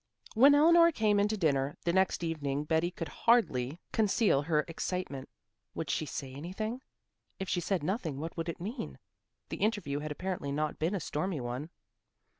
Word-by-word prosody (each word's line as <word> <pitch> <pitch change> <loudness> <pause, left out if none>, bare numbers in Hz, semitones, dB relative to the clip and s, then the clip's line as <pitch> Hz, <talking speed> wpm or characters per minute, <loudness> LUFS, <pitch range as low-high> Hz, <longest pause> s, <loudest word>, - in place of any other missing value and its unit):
When 275 +6 +7
Eleanor 335 +3 +6
came 210 -7 +2
in 205 - +3
to 215 0 -2
dinner 140 -5 +1
the 170 - +1
next 190 -2 +2
evening 145 -4 -2
Betty 160 +2 +1
could 170 -2 -6
hardly 150 - +2
conceal 210 - +3
her 150 0 +1
excitement. 165 -5 -4 0.5
Would 155 -4 -2
she 155 - -1
say 135 -2 -5
anything? 205 - -4 0.6
If 190 - -4
she 180 - 0
said 185 -3 -1
nothing 165 - -2
what 165 +2 -5
would 165 0 -3
it 170 - -5
mean? 225 +7 -5 0.5
The - - -4
interview 205 -10 0
had 150 0 -5
apparently 175 -3 -3
not 150 +1 -2
been 165 +6 0
a - - -1
stormy 160 +1 -2
one. 125 +5 -4
170 Hz, 175 wpm, -31 LUFS, 150-205 Hz, 0.6 s, When